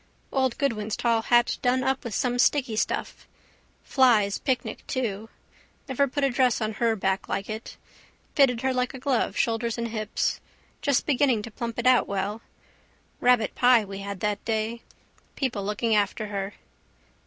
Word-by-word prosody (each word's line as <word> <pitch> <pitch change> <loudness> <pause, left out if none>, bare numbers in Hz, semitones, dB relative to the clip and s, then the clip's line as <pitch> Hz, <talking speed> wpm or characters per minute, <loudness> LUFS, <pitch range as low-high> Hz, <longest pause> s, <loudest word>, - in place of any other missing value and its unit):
Old 260 -3 +1
Goodwin's 220 -7 -1
tall 230 -2 +2
hat 240 +1 +2
done 255 +1 +2
up 265 0 0
with 235 -5 -5
some 245 -2 0
sticky 255 -3 +2
stuff. 215 - -2 0.6
Flies' 225 -7 +3
picnic 260 -3 -2
too. 225 -4 -3 0.6
Never 280 +1 +1
put 285 +2 -2
a 275 - +3
dress 250 -1 +2
on 220 0 -2
her 230 -1 +3
back 190 -1 -1
like 195 - -2
it. 220 +1 -7 0.6
Fitted 250 -5 +3
her 265 0 +1
like 250 0 -1
a - - -7
glove, 260 -2 0
shoulders 230 0 0
and 235 0 -2
hips. 215 -1 -2 0.4
Just 280 -3 +1
beginning 260 -6 +2
to 230 - -8
plump 230 +1 -5
it 240 - -3
out 255 -1 +5
well. 200 +3 -3 0.8
Rabbitpie 245 -1 +4
we 195 0 -7
had 200 -1 -6
that 210 -1 -1
day. 225 +1 -2 0.5
People 240 -7 -2
looking 210 +3 0
after 210 +1 0
her. 200 0 -4
235 Hz, 160 wpm, -26 LUFS, 215-255 Hz, 0.8 s, out